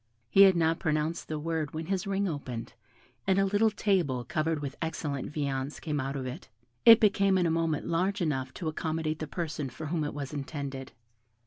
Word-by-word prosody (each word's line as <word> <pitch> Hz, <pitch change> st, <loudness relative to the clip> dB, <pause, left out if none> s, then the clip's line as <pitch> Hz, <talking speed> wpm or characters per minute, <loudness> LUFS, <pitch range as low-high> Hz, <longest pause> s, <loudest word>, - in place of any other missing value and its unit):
He 195 Hz, -, +6 dB
had 195 Hz, -2 st, +8 dB
not 165 Hz, -1 st, +2 dB
pronounced 155 Hz, 0 st, -1 dB
the 155 Hz, -, -3 dB
word 160 Hz, 0 st, -2 dB
when 160 Hz, +1 st, -3 dB
his 190 Hz, +2 st, -2 dB
ring 200 Hz, 0 st, 0 dB
opened, 130 Hz, -8 st, -5 dB, 0.5 s
and 190 Hz, -, +3 dB
a 195 Hz, -, +4 dB
little 205 Hz, +3 st, +3 dB
table 185 Hz, -, +1 dB
covered 155 Hz, +5 st, -1 dB
with 140 Hz, -1 st, -5 dB
excellent 155 Hz, -4 st, -3 dB
viands 140 Hz, -2 st, -2 dB
came 150 Hz, -3 st, -2 dB
out 135 Hz, +1 st, -3 dB
of 135 Hz, -2 st, -3 dB
it. 125 Hz, 0 st, -7 dB, 0.4 s
It 230 Hz, -1 st, +11 dB
became 195 Hz, -2 st, +4 dB
in 180 Hz, -, +2 dB
a 165 Hz, -, +2 dB
moment 165 Hz, -2 st, 0 dB
large 185 Hz, +4 st, 0 dB
enough 135 Hz, -7 st, -1 dB
to 170 Hz, -, -4 dB
accommodate 155 Hz, 0 st, -2 dB
the 155 Hz, -, -4 dB
person 155 Hz, -4 st, -3 dB
for 155 Hz, -, -8 dB
whom 160 Hz, +1 st, -1 dB
it 145 Hz, -, -4 dB
was 140 Hz, -1 st, -5 dB
intended. 140 Hz, -2 st, -5 dB
155 Hz, 200 wpm, -29 LUFS, 145-175 Hz, 0.5 s, It